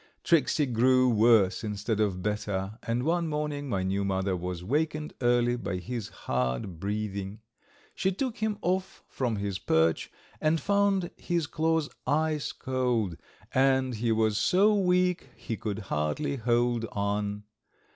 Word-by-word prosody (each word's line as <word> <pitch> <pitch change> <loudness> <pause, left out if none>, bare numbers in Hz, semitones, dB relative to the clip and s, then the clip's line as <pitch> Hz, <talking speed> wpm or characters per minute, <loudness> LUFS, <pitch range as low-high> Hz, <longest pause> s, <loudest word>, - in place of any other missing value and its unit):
Tricksey 155 -2 +3
grew 130 +1 +4
worse 110 -3 +4
instead 105 +1 -2
of 95 -4 0
better, 105 -1 -2
and 115 +2 -1
one 170 +2 +1
morning 150 -2 -3
my 95 -5 0
new 95 +1 0
mother 95 -1 0
was 90 0 -4
wakened 150 - -1
early 120 0 +3
by 100 -6 -3
his 115 +4 -5 0.2
hard 65 +7 -1
breathing. 100 0 -3 0.5
She 190 - 0
took 245 +4 -3
him 215 -1 -1
off 185 +1 -1
from 125 -4 -2
his 100 -1 -3
perch 80 0 +1 0.3
and 155 +1 +2
found 200 0 +1
his 170 -2 -1
claws 160 0 0 0.2
ice 155 -1 +1
cold, 125 -8 -1 0.4
and 130 -1 +3
he 115 +1 0
was 110 -1 +2
so 200 +3 +4
weak 180 -2 +2
he 115 - -5
could 105 -3 -4 0.2
hardly 75 - -1
hold 120 0 +1
on. 105 0 -1
120 Hz, 140 wpm, -28 LUFS, 100-155 Hz, 0.5 s, grew